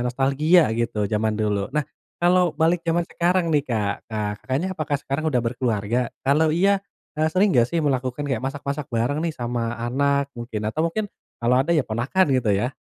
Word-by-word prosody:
nostalgia 140 Hz, +7 st, +3 dB, 0.2 s
gitu 115 Hz, -2 st, -1 dB
jaman 110 Hz, 0 st, +1 dB
dulu. 105 Hz, -2 st, -1 dB
Nah, 150 Hz, -2 st, +1 dB, 0.4 s
kalau 180 Hz, -1 st, +3 dB
balik 165 Hz, +2 st, +2 dB
jaman 170 Hz, +1 st, +1 dB
sekarang 175 Hz, 0 st, +1 dB
nih, 145 Hz, -2 st, +3 dB
Kak, 105 Hz, -5 st, 0 dB, 0.2 s
nah, 105 Hz, -1 st, -2 dB
Kakaknya 140 Hz, +8 st, -2 dB
apakah 150 Hz, -3 st, -1 dB
sekarang 140 Hz, +2 st, -3 dB
udah 125 Hz, -4 st, +1 dB
berkeluarga? 115 Hz, -2 st, -1 dB, 0.3 s
Kalau 155 Hz, +3 st, +4 dB
iya, 195 Hz, +3 st, +3 dB, 0.4 s
eee, 155 Hz, 0 st, +3 dB
sering 200 Hz, +3 st, +4 dB
nggak 120 Hz, -1 st, +5 dB
sih 170 Hz, -, 0 dB
melakukan 130 Hz, 0 st, -1 dB
kayak 130 Hz, -3 st, -1 dB
masak-masak 140 Hz, +1 st, -3 dB
bareng 120 Hz, +6 st, 0 dB
nih 165 Hz, -, -1 dB
sama 120 Hz, -2 st, -2 dB
anak, 140 Hz, +3 st, +1 dB
mungkin. 115 Hz, -3 st, -5 dB
Atau 155 Hz, -, -1 dB
mungkin 210 Hz, +6 st, -2 dB, 0.4 s
kalau 125 Hz, +2 st, +3 dB
ada 165 Hz, -, -4 dB
ya 155 Hz, -, +3 dB
ponakan, 125 Hz, +12 st, +1 dB
gitu 115 Hz, -4 st, 0 dB
ya? 120 Hz, +7 st, -1 dB
135 Hz, 180 wpm, -23 LUFS, 120-160 Hz, 0.4 s, nggak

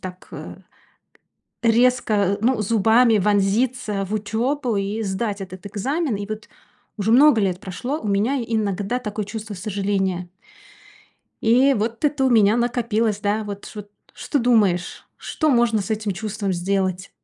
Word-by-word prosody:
так, 185 Hz, 0 st, -9 dB
э, -, -, -8 dB, 1.1 s
резко, 225 Hz, -4 st, +2 dB
ну, 230 Hz, -1 st, +1 dB
зубами 225 Hz, +2 st, +4 dB
вонзиться 210 Hz, +2 st, +1 dB
в 210 Hz, -, -4 dB
учебу 235 Hz, +4 st, -1 dB
и 200 Hz, +3 st, -2 dB
сдать 200 Hz, +1 st, -2 dB
этот 185 Hz, +1 st, -9 dB
экзамен. 260 Hz, -, -2 dB
И 200 Hz, 0 st, -5 dB
вот 215 Hz, 0 st, -6 dB, 0.5 s
уже 220 Hz, +1 st, 0 dB
много 265 Hz, -3 st, +6 dB
лет 185 Hz, -2 st, 0 dB
прошло, 245 Hz, -, -4 dB
у 215 Hz, -, -4 dB
меня 225 Hz, +7 st, +1 dB
иногда 215 Hz, +1 st, -1 dB
такое 210 Hz, -3 st, -4 dB
чувство 215 Hz, -1 st, -6 dB
сожаления. 195 Hz, -2 st, -2 dB, 1.1 s
И 255 Hz, +5 st, +4 dB
вот 230 Hz, +5 st, -3 dB
это 290 Hz, -2 st, +1 dB
у 260 Hz, -, +3 dB
меня 220 Hz, -1 st, +4 dB
накопилось, 230 Hz, -3 st, 0 dB
да, 210 Hz, 0 st, -1 dB
вот 200 Hz, -1 st, -7 dB
ч -, -, -9 dB
вот 205 Hz, 0 st, -8 dB, 0.2 s
что 290 Hz, -, -2 dB
думаешь? 210 Hz, -8 st, +1 dB
Что 310 Hz, -2 st, -1 dB
можно 235 Hz, -4 st, +2 dB
с 220 Hz, -, -8 dB
этим 215 Hz, -2 st, -1 dB
чувством 200 Hz, +1 st, -3 dB
сделать? 185 Hz, +1 st, -1 dB
215 Hz, 145 wpm, -22 LUFS, 200-235 Hz, 1.1 s, много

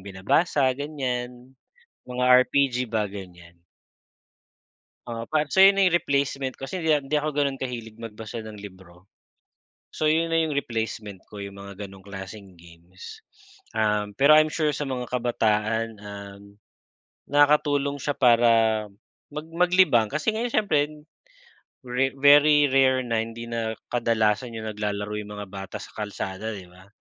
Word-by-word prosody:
binabasa 130 Hz, -, +1 dB
ganyan 125 Hz, -3 st, -5 dB, 0.5 s
mga 125 Hz, 0 st, -3 dB, 0.3 s
RPG 135 Hz, -3 st, +2 dB
ba 110 Hz, -2 st, 0 dB
gan'yan. 90 Hz, -4 st, -11 dB, 1.5 s
Oo 115 Hz, -1 st, -6 dB
pa 155 Hz, -1 st, +1 dB
so, 190 Hz, -, +5 dB
ayun 195 Hz, 0 st, +7 dB
na 195 Hz, -, +5 dB
yung 180 Hz, -, +2 dB
replacement 140 Hz, -1 st, -1 dB
kasi 170 Hz, +7 st, -5 dB
hindi, 160 Hz, -, -1 dB
ah, 150 Hz, -, +5 dB
hindi 135 Hz, +1 st, -7 dB
ako 150 Hz, 0 st, +1 dB
ganun 140 Hz, -2 st, 0 dB
kahilig 115 Hz, -4 st, -5 dB
magbasa 110 Hz, 0 st, -7 dB
ng 110 Hz, -1 st, -10 dB
libro. 95 Hz, -3 st, -13 dB, 0.9 s
So, 155 Hz, -1 st, +1 dB
yun 165 Hz, +1 st, +1 dB
na 165 Hz, -, +3 dB
yung 155 Hz, -3 st, -1 dB
replacement 110 Hz, -6 st, -4 dB
ko 105 Hz, -, -11 dB
yung 100 Hz, 0 st, -8 dB
mga 100 Hz, +1 st, -8 dB
ganong 95 Hz, 0 st, -13 dB
klaseng 95 Hz, -1 st, -10 dB
games, 85 Hz, +2 st, -13 dB, 0.6 s
um, 105 Hz, -1 st, 0 dB
pero 140 Hz, +3 st, +6 dB
I'm 155 Hz, 0 st, +6 dB
sure 150 Hz, -2 st, 0 dB
sa 145 Hz, -2 st, -4 dB
mga 125 Hz, -2 st, -3 dB
kabataan, 115 Hz, -2 st, 0 dB
um, 100 Hz, -1 st, -9 dB, 0.9 s
nakakatulong 145 Hz, -1 st, +2 dB
siya 145 Hz, +1 st, -2 dB
para 120 Hz, -2 st, +5 dB, 0.8 s
mag 150 Hz, +1 st, -7 dB
maglibang, 180 Hz, -, +4 dB
kasi 155 Hz, -, -1 dB
ngayon 230 Hz, +3 st, -2 dB
siyempre 205 Hz, -8 st, +2 dB, 1.1 s
very 130 Hz, +2 st, -1 dB
very 145 Hz, 0 st, +6 dB
rare 130 Hz, -1 st, +3 dB
na 115 Hz, -2 st, -1 dB
hindi 115 Hz, +1 st, -5 dB
na 115 Hz, -1 st, -3 dB, 0.2 s
kadalasan 115 Hz, 0 st, 0 dB
yung 110 Hz, 0 st, -5 dB
naglalaro 105 Hz, 0 st, -3 dB
yung 105 Hz, 0 st, -8 dB
mga 105 Hz, -1 st, -7 dB
bata 95 Hz, -1 st, -8 dB
sa -, -, -12 dB
kalsada 105 Hz, +1 st, -4 dB
'di 90 Hz, -2 st, -11 dB
ba? 95 Hz, +2 st, -18 dB
120 Hz, 145 wpm, -25 LUFS, 105-145 Hz, 1.5 s, ayun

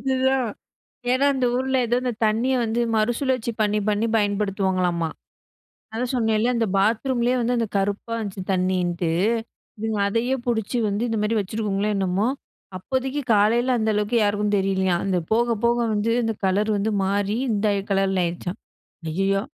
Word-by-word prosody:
அதுதான் 265 Hz, 0 st, +1 dB, 0.7 s
ஏனா, 270 Hz, +2 st, +3 dB
"அந்த 255 Hz, -2 st, +1 dB
ஊர்ல 265 Hz, +1 st, 0 dB
ஏதோ 240 Hz, +2 st, +1 dB
அந்த 250 Hz, -1 st, -1 dB
தண்ணிய 230 Hz, +5 st, +2 dB
வந்து 225 Hz, +1 st, -1 dB
மறுசுழற்சி 240 Hz, +2 st, 0 dB
பண்ணி, 210 Hz, 0 st, +2 dB
பண்ணி 210 Hz, +2 st, +1 dB
பயன்படுத்துவாங்களாமா." 190 Hz, -5 st, 0 dB, 0.8 s
அதான் 245 Hz, +3 st, -2 dB
சொன்னேல, 225 Hz, -1 st, +2 dB
அந்த 230 Hz, -1 st, +1 dB
பாத்ரூம்லேயே 235 Hz, +4 st, +1 dB
வந்து 245 Hz, +1 st, +1 dB
அந்த 230 Hz, -, 0 dB
கருப்பா 200 Hz, +3 st, -1 dB
வந்துச்சு 200 Hz, -3 st, -5 dB
தண்ணிண்ணுட்டு. 180 Hz, -2 st, 0 dB, 0.7 s
இதுங்க 220 Hz, -1 st, -2 dB
அதையே 235 Hz, +5 st, 0 dB
புடிச்சு 235 Hz, 0 st, -1 dB
வந்து 205 Hz, +2 st, -1 dB
இந்த 225 Hz, -, -1 dB
மாரி 220 Hz, +2 st, 0 dB
வச்சுருக்குங்காங்களோ 205 Hz, 0 st, -1 dB
என்னமோ? 195 Hz, +3 st, +1 dB, 0.5 s
"அப்போதைக்கு 265 Hz, +7 st, -2 dB
காலையில 235 Hz, +5 st, +3 dB
அந்த 220 Hz, -1 st, +1 dB
அளவுக்கு 210 Hz, +3 st, 0 dB
யாருக்கும் 205 Hz, 0 st, +1 dB
தெரியலையாம். 190 Hz, -2 st, 0 dB
அந்த 185 Hz, -2 st, +1 dB
போக, 235 Hz, +1 st, +2 dB
போக 235 Hz, 0 st, +2 dB, 0.2 s
வந்து, 210 Hz, +2 st, 0 dB
இந்த 225 Hz, -1 st, -1 dB
கலர் 205 Hz, +3 st, +1 dB
வந்து 215 Hz, +2 st, 0 dB
மாறி 200 Hz, +2 st, 0 dB, 0.2 s
இந்த 210 Hz, 0 st, 0 dB, 0.3 s
கலர்ல 195 Hz, -1 st, +1 dB
ஆயிருச்சாம்." 175 Hz, +2 st, -4 dB, 0.5 s
ஐயயோ! 195 Hz, +3 st, +1 dB
215 Hz, 145 wpm, -23 LUFS, 195-240 Hz, 0.8 s, ஏனா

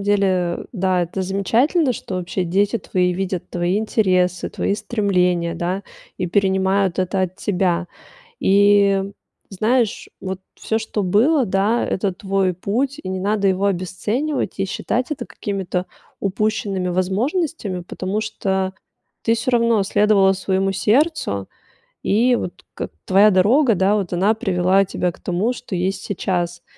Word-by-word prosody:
уделе, 190 Hz, -4 st, +1 dB
да- 185 Hz, -4 st, +1 dB
это 175 Hz, +3 st, -3 dB
замечательно, 235 Hz, -, +2 dB
что 200 Hz, -, -6 dB
вообще 180 Hz, +1 st, -2 dB
дети 200 Hz, +6 st, +1 dB
твои 180 Hz, -2 st, 0 dB
видят 185 Hz, -1 st, -3 dB
твои 175 Hz, +3 st, 0 dB
интересы, 185 Hz, -5 st, +1 dB
твои -, -, -1 dB
стремления, 180 Hz, -6 st, 0 dB
да, 180 Hz, +3 st, -2 dB, 0.3 s
и 180 Hz, -, -2 dB
перенимают 190 Hz, 0 st, +1 dB
это 185 Hz, +1 st, 0 dB
от 185 Hz, 0 st, -3 dB
тебя. 180 Hz, -3 st, 0 dB, 0.5 s
И, 200 Hz, 0 st, +4 dB, 0.5 s
знаешь, 225 Hz, +3 st, 0 dB
вот 190 Hz, 0 st, -5 dB
всё, 220 Hz, -, -2 dB
что 220 Hz, -1 st, -3 dB
было, 245 Hz, -, +3 dB
да- 200 Hz, +5 st, +1 dB
это 190 Hz, 0 st, -1 dB
твой 190 Hz, -1 st, 0 dB
путь, 250 Hz, -, -2 dB
и -, -, -6 dB
не 185 Hz, 0 st, -3 dB
надо 200 Hz, +1 st, +1 dB
его 190 Hz, +1 st, +1 dB
обесценивать 205 Hz, -, -2 dB
и -, -, +2 dB
считать 250 Hz, +6 st, -2 dB
это 280 Hz, -5 st, -4 dB
какими-то 190 Hz, -2 st, -3 dB, 0.3 s
упущенными 200 Hz, -2 st, -1 dB
возможностями, 200 Hz, -, -1 dB
потому 190 Hz, +4 st, -3 dB
что 190 Hz, -3 st, -2 dB, 0.5 s
ты 230 Hz, -, +2 dB
всё 230 Hz, +2 st, -1 dB
равно 230 Hz, -3 st, +3 dB
следовала 200 Hz, -1 st, +4 dB
своему 195 Hz, 0 st, 0 dB
сердцу. 215 Hz, -, +1 dB, 0.5 s
И 240 Hz, +5 st, +3 dB
вот 180 Hz, -, -6 dB
как -, -, -5 dB
твоя 200 Hz, +3 st, +5 dB
дорога, 225 Hz, +7 st, +4 dB
да, 195 Hz, +3 st, +2 dB
вот 190 Hz, -4 st, -3 dB
она 195 Hz, +5 st, +2 dB
привела 190 Hz, -2 st, +2 dB
тебя 180 Hz, -2 st, -2 dB
к -, -, -19 dB
тому, 185 Hz, +7 st, 0 dB
что 240 Hz, -4 st, -7 dB
есть 185 Hz, +2 st, -1 dB
сейчас. 175 Hz, -3 st, -2 dB
195 Hz, 140 wpm, -20 LUFS, 185-215 Hz, 0.5 s, твоя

